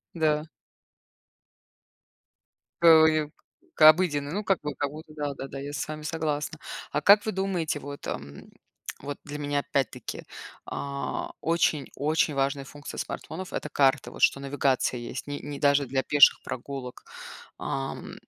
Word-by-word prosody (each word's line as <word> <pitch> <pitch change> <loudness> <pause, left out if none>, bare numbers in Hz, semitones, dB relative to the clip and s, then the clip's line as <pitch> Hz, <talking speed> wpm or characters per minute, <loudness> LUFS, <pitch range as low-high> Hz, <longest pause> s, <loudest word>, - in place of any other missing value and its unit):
Н-да. 155 -1 +1 2.4
Кого 160 -1 +8
неб 155 -1 +1 0.4
к - - -10
обыденной, 150 -4 +2
ну, 210 +2 -2
как 195 -1 +2
бы, 150 -2 -4
как 145 +2 -2
будто 155 0 -11
да 145 -1 -2
да 135 0 -7
да, 135 - -7
я 145 +1 -6
с - - -3
вами 155 0 -6
согласна. 155 -1 -2 0.3
А - - 0
как 205 +1 +7
вы 215 - 0
думаете, 180 -5 -1
вот, 140 0 -8
ам, 70 +1 -6 0.6
вот 145 0 -5
для 150 0 -7
меня 145 -1 0
опять-таки, 140 -1 -3 0.4
а, 140 0 -4
очень 165 -3 +1
очень 155 0 +1
важная 135 0 0
функция 145 0 -8
смартфонов- 185 +4 -6
это 150 - -3
карты, 135 -1 +2
вот, - - -10
что - - +4
навигация 135 -3 0
есть 120 +2 -6
не, 145 0 -5
ни 145 -1 -6
даже 140 -2 +3
для 130 +1 0
пеших 145 -1 +6
прогулок. 130 0 -6 0.5
Ам, 135 0 -4
145 Hz, 150 wpm, -27 LUFS, 140-155 Hz, 2.4 s, Кого